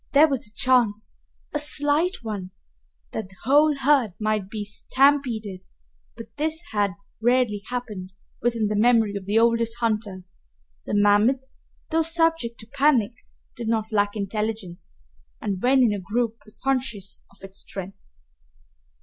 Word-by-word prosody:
There 295 +3 +7
was 270 -7 -2
a 210 - -14
chance 235 -5 +1 0.3
a 300 - +1
slight 295 +2 +2
one 205 -5 -5 0.6
that 185 - -5
the 190 - -18
whole 295 +4 +4
herd 270 -8 +2
might 215 -3 -1
be 210 0 -5
stampeded, 230 -4 +1 0.6
but 230 -1 -11
this 315 +2 0
had 205 -3 0 0.3
rarely 240 -3 +2
happened 210 -7 -5 0.3
within 235 -2 +1
the 210 0 -1
memory 225 -1 +3
of 195 -1 -6
the 210 +2 +2
oldest 230 0 +2
hunter. 215 -5 -2 0.6
The - - -1
mammoth, 205 +6 +3 0.5
though 325 +1 +3
subject 325 -7 +1
to - - -11
panic, 275 -6 +3 0.4
did 235 -1 -5
not 220 0 -1
lack 205 -1 +1
intelligence 210 -3 -4 0.4
and 195 -3 -3
when 260 +1 +4
in 225 -4 +3
a 205 - -3
group 225 +4 -1
was 215 - -9
conscious 250 -8 -2
of 200 - -20
its 195 0 -8
strength. 195 0 -7
225 Hz, 145 wpm, -24 LUFS, 205-260 Hz, 0.6 s, There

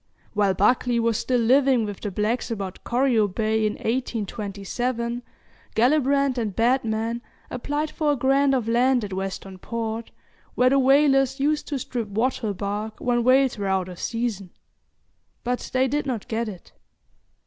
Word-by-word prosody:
While 200 -2 +2
Buckley 235 +4 +2
was 230 -1 +1
still 250 -1 +1
living 255 0 +4
with 205 -2 -6
the 210 - -3
blacks 210 +6 -1
about 195 -5 -5
Corio 240 -3 +2
Bay, 215 +2 0
in 210 - -2
1827, 235 +1 -3 0.5
Gellibrand 275 +1 +3
and 210 -5 -3
Batman 230 -1 +1 0.3
applied 290 +5 -2
for 305 -2 +1
a - - 0
grant 270 +1 +3
of 240 -4 -1
land 245 +1 +3
at 200 -2 -5
Western 190 0 -5
Port, 225 +1 -4 0.5
where 255 +1 +4
the 275 - +4
whalers 270 0 +4
used 295 +2 0
to 290 - -2
strip 240 -3 -4
wattle 220 0 -1
bark 205 +3 -4
when 240 -1 +1
whales 255 -1 +3
were 200 - -2
out 190 -1 0
of 180 -2 -9
season; 230 -5 -3 0.9
but 245 0 -2
they 260 0 +2
did 290 +2 -1
not 240 -6 -3
get 225 0 -2
it. 185 -4 -11
235 Hz, 155 wpm, -24 LUFS, 210-260 Hz, 0.9 s, living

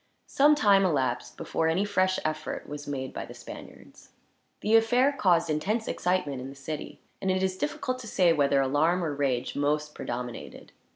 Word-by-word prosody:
Some 295 +2 +4
time 200 -8 +4
elapsed 135 -9 -1
before 160 - -1
any 175 +5 +1
fresh 185 -2 +1
effort 155 0 -3
was 145 0 -7
made 130 -2 -4
by - - -4
the - - -11
Spaniards. - - -12 0.5
The 215 +2 +3
affair 245 +5 +4
caused 180 -11 +2
intense 195 +9 -1
excitement 160 -7 -1
in 130 - -7
the 135 - -11
city, 145 +2 -7 0.2
and 190 - -1
it 185 0 +1
is 190 -1 0
difficult 255 +2 -3
to 240 - -8
say 180 -5 +3
whether 140 -2 +3
alarm, 155 +7 +2
or 155 -3 -1
rage, 135 -3 -1
most 150 +1 0
predominated. 120 0 -6
165 Hz, 175 wpm, -27 LUFS, 145-200 Hz, 0.5 s, Some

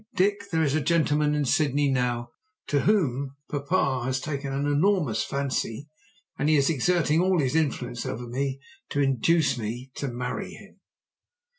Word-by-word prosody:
"Dick, 200 +2 +1
there 160 -1 +1
is 140 -3 +1
a 155 - +1
gentleman 150 -2 +2
in 145 -1 0
Sydney 145 +1 +2
now 120 -2 -1 0.3
to 145 - +1
whom 140 - +1 0.2
papa 140 -3 0
has 130 +1 -1
taken 140 -1 -4
an 140 +1 -1
enormous 145 - +2
fancy, 140 -1 -3 0.5
and 145 - +2
he 155 - +5
is 140 +2 +3
exerting 165 +2 +2
all 185 0 +2
his 135 0 0
influence 130 -6 -1
over 120 +1 -5
me 135 +2 -2 0.3
to 145 - -2
induce 140 +2 +2
me 120 +4 -5
to 140 - -4
marry 125 0 -4
him." - - -15
140 Hz, 160 wpm, -26 LUFS, 130-155 Hz, 0.5 s, he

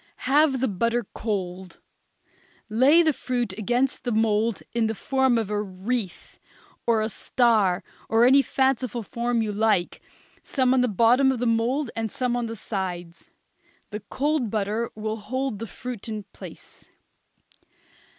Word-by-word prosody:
Have 275 -1 +3
the 260 - +2
butter 230 +4 0
cold; 185 -4 -4 0.9
lay 270 +10 +5
the 315 -2 +3
fruit 245 -6 -2
against 240 +6 -1
the 245 - -2
mould 220 0 +1
in 230 -1 +1
the 220 - -2
form 265 +1 +1
of 220 -3 -2
a 210 0 0
wreath, 200 +1 -4 0.5
or 230 -2 +3
a - - 0
star, 215 -4 +2 0.3
or 225 +1 +5
any 270 +2 +6
fanciful 260 -4 0
form 235 +2 -1
you 215 - -2
like, 210 -4 +1 0.4
some 260 -2 +1
on 260 - +3
the 250 - +2
bottom 240 +5 +4
of 260 - -2
the 245 - -2
mould 235 +4 +1
and 225 -1 -2
some 250 -3 -1
on 240 -1 -1
the 225 - -5
sides. 180 -5 -5 0.6
The 210 - -4
cold 290 -3 0
butter 215 +2 -1
will 215 +1 -3
hold 255 +1 -3
the 230 - -5
fruit 240 -1 -7
in 215 -1 -4
place. - - -12
230 Hz, 150 wpm, -25 LUFS, 210-255 Hz, 0.9 s, any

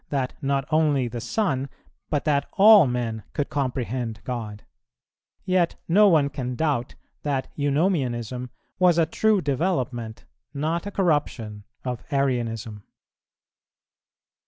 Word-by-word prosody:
that 135 -3 -1
not 135 0 0
only 150 -5 +2
the 120 0 -5
Son, 140 - -1 0.4
but 145 -2 -1
that 145 -2 +1
all 205 -5 +8
men 120 -3 -2
could 145 - -2
comprehend 125 -5 -2
God; 110 -4 -5 0.8
yet 185 -2 +2
no 205 +5 +6
one 155 -5 +4
can 130 -3 -4
doubt 140 -5 -1 0.3
that 140 -3 -2
Eunomianism 135 - 0 0.3
was 180 -2 +4
a 165 - +4
true 210 +4 +2
development, 130 -7 -2 0.3
not 160 +6 -1
a - - -5
corruption 130 - -1 0.2
of 125 -2 -3
Arianism. 115 -6 -1
140 Hz, 115 wpm, -24 LUFS, 120-160 Hz, 0.8 s, all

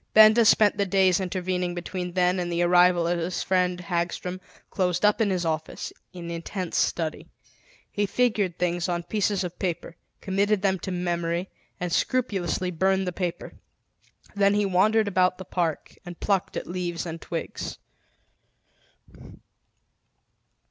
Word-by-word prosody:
Benda 220 +2 +8
spent 210 -1 +5
the 200 -1 +1
days 190 -1 +3
intervening 180 -1 -2
between 180 0 -5
then 180 0 +2
and 175 -1 -2
the 170 0 +1
arrival 175 0 +5
of 170 0 0
his 170 +1 -2
friend 180 -1 +1
Hagstrom, 180 +1 -3 0.3
closed 180 -1 +1
up 210 +2 +3
in 215 - +3
his 180 -2 -1
office, 160 -1 -3 0.2
in 170 -2 -7
intense 170 +2 -5
study. 160 -2 -1 0.6
He 205 0 0
figured 210 -5 +1
things 175 0 -1
on 170 -1 -1
pieces 205 +1 0
of 180 -1 -6
paper, 175 -2 -3 0.2
committed 200 +1 0
them 190 -2 +2
to 190 - -5
memory, 175 0 -2 0.3
and 175 -1 -3
scrupulously 190 -8 0
burned 190 +3 +1
the 180 - -2
paper. 175 -1 -4 0.8
Then 200 0 +3
he 205 0 +2
wandered 210 +3 +3
about 185 -2 +2
the 190 - -8
park 170 -4 -2
and 175 -1 -9
plucked 195 -3 0
at - - -4
leaves 175 -1 -3
and 165 -1 -6
twigs. 165 -2 -5
180 Hz, 145 wpm, -26 LUFS, 175-195 Hz, 0.8 s, Benda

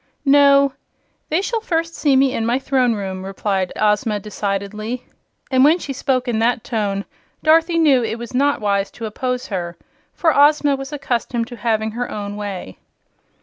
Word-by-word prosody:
"No; 280 -1 +5 0.6
they 330 +5 +1
shall 455 +1 -2
first 330 -5 -1
see 285 -4 +2
me 265 0 +3
in 225 - -1
my 235 +2 +1
Throne 260 -3 +1
Room," 190 -2 -5
replied 195 -1 -2
Ozma, 210 0 +1
decidedly; 210 +3 -4 0.5
and 260 0 +4
when 310 +4 +6
she 285 -6 -5
spoke 255 -1 -1
in 230 -2 0
that 235 0 +1
tone 205 -4 -2 0.4
Dorothy 330 +2 +4
knew 285 -7 +4
it 225 0 -2
was 235 0 -8
not 280 +3 +2
wise 200 -1 0
to 230 - -6
oppose 250 +3 -3
her, 175 -4 -4 0.3
for 325 -3 +1
Ozma 290 0 +4
was 270 +1 -7
accustomed 245 -4 -2
to 245 - -8
having 220 -2 -1
her 245 +2 -4
own 205 -1 -5
way. 200 - -6
240 Hz, 170 wpm, -20 LUFS, 210-280 Hz, 0.6 s, when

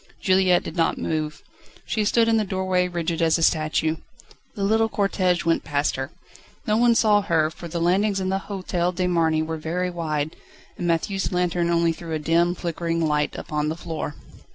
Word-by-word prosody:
Juliette 185 -2 +3
did 160 - -7
not 165 -2 +1
move. 155 -1 -3 0.4
She 215 -2 -1
stood 230 +2 +3
in 225 0 +3
the 215 - +2
doorway 185 -2 0
rigid 170 -1 -2
as 165 0 +3
a 165 - -1
statue. 155 0 +1 0.6
The 200 - -3
little 220 +2 +2
cortège 185 -4 0
went 165 0 +2
past 145 0 0
her. 135 0 -4 0.6
No 210 - +2
one 235 +1 +4
saw 210 -2 +4
her, 160 -5 +1
for 170 - -9
the 170 +1 -4
landings 195 +4 +2
in 185 0 -1
the 190 0 0
Hotel 180 -3 -1
de 180 0 -1
Marny 165 -3 +2
are 160 0 -4
very 180 +4 -2
wide, 155 -3 -2 0.4
and 175 - -3
Matthieu's 190 +4 0
lantern 175 -1 0
only 170 -1 +2
threw 165 0 -7
a - - +1
dim, 170 +3 +2
flickering 165 -1 -2
light 150 -1 0
upon 150 0 -2
the 160 - -3
floor. 160 -3 -5
170 Hz, 190 wpm, -24 LUFS, 160-190 Hz, 0.6 s, one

